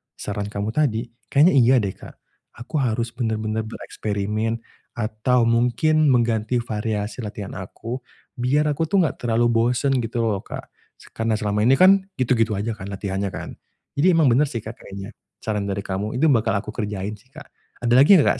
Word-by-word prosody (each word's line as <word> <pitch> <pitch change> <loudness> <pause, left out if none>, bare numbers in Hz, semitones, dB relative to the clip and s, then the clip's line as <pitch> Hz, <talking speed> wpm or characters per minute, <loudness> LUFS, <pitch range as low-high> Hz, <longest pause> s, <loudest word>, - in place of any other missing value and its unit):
saran 100 0 -4
kamu 105 +1 -3
tadi, 120 -4 +1 0.2
kayaknya 150 +6 +5
iya 130 -2 +5
deh, 95 - -1
Kak, - - -13 0.5
aku 150 +4 -2
harus 115 -2 0
bener-bener 110 -2 -2
bereksperimen 110 +1 -3 0.3
atau 115 +2 +1
mungkin 125 +7 +3
mengganti 120 -2 +2
variasi 105 -1 -3
latihan 105 -3 -6
aku, 115 +6 -6 0.4
biar 145 +5 +2
aku 160 +2 -1
tuh 195 0 +3
enggak 155 - -2
terlalu 120 0 +2
bosen 120 +4 +2
gitu 115 0 -2
loh, 105 -3 0
Kak. - - -7 0.3
Se - - -18
karena 115 -1 0
selama 105 -1 -1
ini 135 - +6
kan 190 +3 +5
gitu-gitu 115 -4 +1
aja 105 +4 -2
kan 105 -3 -7
latihannya 100 0 -3
kan, - - -6 0.5
jadi 180 +3 +5
emang 155 -7 +4
bener 140 +5 +4
sih, 115 -5 -5
Kak, 110 +1 -8
kayaknya 100 +2 -8 0.3
saran 105 -2 -2
dari 100 0 -3
kamu 100 +4 -3
itu 150 +4 +3
bakal 110 -4 +1
aku 100 - -3
kerjain 105 -2 -4
sih, 125 - -26
Kak. 155 -1 -10 0.4
Ada 120 - +3
lagi 150 +9 +8
enggak, 145 - +3
115 Hz, 175 wpm, -23 LUFS, 105-130 Hz, 0.5 s, lagi